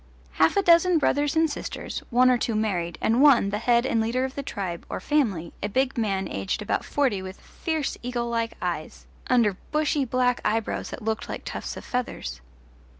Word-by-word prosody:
Half 160 - +3
a 400 - +4
dozen 345 0 +5
brothers 290 0 +1
and 320 0 +4
sisters, 290 - -5
one 255 +1 +5
or 250 - +4
two 230 - -1
married, 180 -6 -1
and 230 +4 +2
one, 265 -9 +6
the 210 - -1
head 235 +1 +3
and 230 -3 +1
leader 245 +4 0
of 265 - -5
the 280 - -4
tribe, 190 -10 -5
or - - -3
family, 195 - 0
a 205 - -2
big 265 +4 +1
man 200 -5 -1
aged 95 - -3
about - - -1
forty 260 -9 0
with 190 +1 -8
fierce 315 -4 -3
eagle 245 -1 -2
like 230 -1 -2
eyes - - -4 0.2
under 230 -7 +3
bushy 300 -1 +1
black 250 0 +1
eyebrows 220 +1 -1
that 250 - -8
looked 220 0 -2
like - - -6
tufts - - -5
of - - -9
feathers. 70 - -4
235 Hz, 195 wpm, -25 LUFS, 205-275 Hz, 0.2 s, one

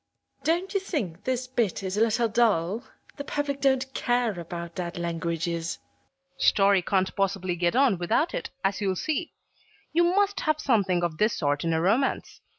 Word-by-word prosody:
Don't 350 +4 0
you 395 - +2
think 225 - -4
this 255 -1 -1
bit 235 -7 -1
is 190 0 -2
a 210 - +1
little 230 +1 +3
dull? 215 -3 +1 0.3
The 285 - -4
public 285 -1 -3
don't 265 -1 +1
care 240 -6 0
about 170 0 -6
dead 175 -1 -5
languages. 170 0 -2 0.6
PUBLISHER. - - +1
Story 200 -1 +5
can't 190 +1 0
possibly 190 -2 0
get 175 +3 0
on 255 -9 +3
without 290 - +1
it, - - -3
as 195 +1 0
you'll 190 -2 0
see. 315 - -2 0.6
You 345 +2 +4
must 400 +2 +2
have 310 -1 0
something 195 -10 +2
of 165 -2 -2
this 215 +1 +2
sort 145 -2 0
in 165 - 0
a 160 - +1
romance. 220 +11 0
205 Hz, 175 wpm, -26 LUFS, 175-270 Hz, 0.6 s, Story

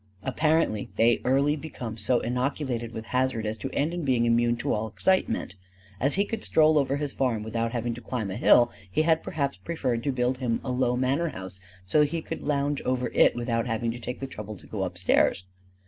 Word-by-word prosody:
Apparently 150 -5 +1
they 115 +2 +3
early 140 +3 +3
become 135 -7 -6
so 115 +3 +1
inoculated 125 -1 -2
with 110 -1 -7
hazard 125 -3 +1
as 105 +1 -1
to - - -4
end 150 +4 -1
in 175 -1 -3
being 125 -4 +2
immune 120 0 +2
to - - -1
all 110 +1 -1
excitement. 185 - 0 0.5
As 140 +6 +2
he 200 +2 +2
could 225 +1 -5
stroll 155 -1 +4
over 140 0 +1
his 145 -1 -3
farm 120 -5 0
without 115 +1 -2
having 120 -1 -2
to 120 - -9
climb 110 -4 -3
a - - -4
hill, 120 +1 +5 0.2
he 155 +11 +1
had 160 0 +3
perhaps 140 -2 -2
preferred 130 -8 -2
to 140 - +1
build 125 0 0
him 120 -3 0
a 130 - -3
low 125 -1 +1
manor 135 +7 +1
house 95 -5 -8 0.3
so 125 +11 +2
that 150 -1 +4
he 165 0 -3
could - - -5
lounge 145 -1 0
over 125 -1 -1
it - - +5
without 120 -1 -1
having 115 0 -1
to 120 - -7
take 125 +2 -5
the 135 - -4
trouble 105 -5 -7
to - - -16
go - - -3
upstairs. 95 - +1
125 Hz, 215 wpm, -27 LUFS, 115-145 Hz, 0.5 s, hill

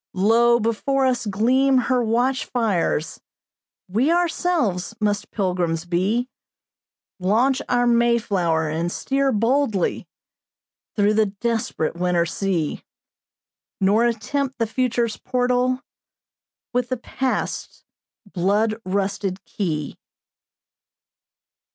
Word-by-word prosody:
Lo! 235 +5 +4
before 250 +5 0
us 245 -3 0
gleam 255 +7 +3
her 255 0 +2
watch 245 +4 +1
fires 200 -9 -1 0.7
We 225 - +1
ourselves 325 - 0
must 205 -1 -1
pilgrims 180 -4 -1
be, 195 +8 0 0.9
Launch 240 +9 +2
our 245 0 +2
Mayflower, 220 -9 +2
and 165 +3 -2
steer 275 +5 0
boldly 230 -3 0 0.9
Through 205 0 +3
the 215 0 +3
desperate 225 -4 -2
winter 175 -1 +1
sea, 170 -3 -2 1.0
Nor 205 +5 +3
attempt 260 +4 -1
the 230 - +1
future's 235 -1 -1
portal 250 +1 0 0.9
With 250 0 0
the 255 - -1
past's 260 +2 -3 0.5
blood 210 +5 +1
rusted 195 0 -2
key.'" 155 -7 -3
225 Hz, 95 wpm, -22 LUFS, 190-250 Hz, 1.0 s, Lo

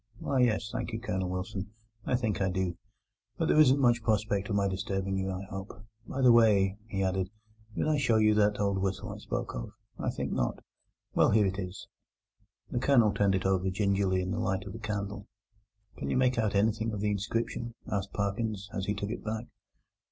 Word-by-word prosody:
"Why, 135 - -1
yes, 115 -3 +2
thank 120 - -4
you, 110 - -2
Colonel 95 -6 -2
Wilson, 95 +2 -4 0.4
I 125 - +2
think 110 -5 -1
I 95 - +2
do; 90 -1 -1 0.6
but - - 0
there - - +4
isn't 140 -2 +6
much 120 -3 +4
prospect 105 -2 0
of 105 - 0
my 100 -1 +2
disturbing 95 0 -2
you, 95 0 -1
I 95 0 -4
hope. 95 0 -5 0.4
By 135 - -3
the 125 - +8
way," 105 -4 +4
he 95 -3 -1
added, 95 0 0 0.5
"did - - 0
I 155 -2 +2
show 125 -5 +3
you 110 0 +5
that 105 -1 +3
old 100 -1 +1
whistle 95 0 -2
I - - -9
spoke - - -4
of? - - -6 0.3
I - - -1
think - - -3
not. - - -1 0.5
Well, - - +4
here 105 -1 +4
it 95 +1 -1
is." 90 0 -6 0.8
The 120 - 0
Colonel 120 -6 +4
turned 100 -1 +2
it 95 - -1
over 95 0 +2
gingerly 95 -1 +1
in 90 - -3
the - - -1
light 95 +1 -1
of - - -7
the 115 - -7
candle. 105 -2 -4 0.7
"Can - - -4
you - - +1
make 130 -1 +3
anything 110 +1 +1
of 105 - -3
the 105 +1 +1
inscription?" 115 +3 -2
asked 100 -1 -2
Parkins, 100 0 -2
as 95 - -2
he 105 - 0
took 100 +1 -3
it - - -5
back. 110 +1 -3
100 Hz, 205 wpm, -30 LUFS, 95-110 Hz, 0.8 s, the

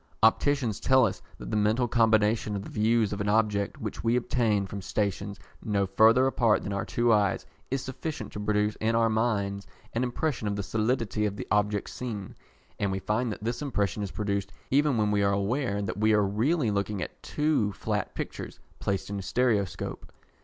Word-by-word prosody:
Opticians 115 -1 +3
tell 130 -2 +5
us - - -3 0.2
that - - -8
the - - 0
mental 110 +4 +2
combination 110 -2 +2
of 100 - -3
the - - -9
views 110 -1 +2
of 100 - -3
an 100 - 0
object 105 -2 +1
which - - -5
we 115 +1 +2
obtain 115 -5 +1
from 100 +1 -6
stations 100 0 -2 0.2
no 100 -2 +1
further 110 +6 +5
apart 120 -5 +2
than 100 - -3
our 100 - -2
two 120 -1 +2
eyes 100 -3 +2 0.2
is 135 0 -1
sufficient 130 -3 -5
to - - -5
produce 105 0 +1
in 115 +1 0
our 115 0 +3
minds 100 -3 0 0.3
an 115 - 0
impression 125 -1 -1
of 100 - -1
the 100 - -3
solidity 110 0 0
of 100 - -4
the - - -5
object 105 -1 +1
seen; 110 -6 -6 0.4
and 100 -1 0
we 95 - -1
find 110 +5 -1
that 105 - -7
this 115 +4 -2
impression 105 -8 -1
is 100 - -3
produced 100 -1 -2 0.2
even 145 -1 +3
when 105 -1 +2
we 105 -1 +2
are 100 0 +3
aware 100 +1 0
that 100 +1 -4
we 110 0 +4
are 105 -1 +4
really 115 - +1
looking 100 -1 -1
at - - -9
two 150 -9 +1
flat - - -3
pictures - - -6 0.2
placed 100 0 -2
in 100 - -3
a - - -4
stereoscope. 100 -1 -1
105 Hz, 195 wpm, -28 LUFS, 100-120 Hz, 0.4 s, tell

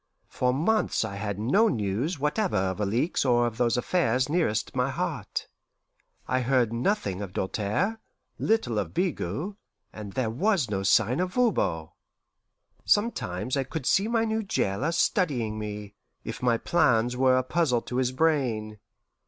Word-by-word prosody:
For 125 0 0
months 165 - +1
I 105 - -5
had 100 -1 -3
no 165 - +3
news 115 - -1
whatever 150 +8 0
of 95 +1 -1
Alixe 115 - 0
or 120 -2 +3
of 115 -2 -3
those 120 -1 +2
affairs 130 -3 +1
nearest 155 -10 0
my - - +1
heart. - - -3 0.8
I 130 - +1
heard 125 -2 +2
nothing 115 - -1
of 95 -3 -6
Doltaire, 110 - -1 0.4
little 165 - +1
of - - -4
Bigot, 170 - -2 0.4
and 105 -2 -8
there 125 -4 -1
was 165 - +1
no 95 -1 -1
sign 110 - +3
of 180 0 -1
Voban. 90 - +1 0.9
Sometimes 125 - 0
I 135 - +1
could 135 +1 -6
see 195 +9 +3
my 230 -1 +1
new 220 0 -1
jailer 145 - -1
studying 135 - 0
me, 105 -1 -6 0.3
if - - -6
my 120 -2 +2
plans 125 -5 +2
were 130 0 +4
a 130 - +1
puzzle 130 -4 +1
to 125 - -4
his 130 -1 +1
brain. 130 -8 0
125 Hz, 155 wpm, -27 LUFS, 110-170 Hz, 0.9 s, were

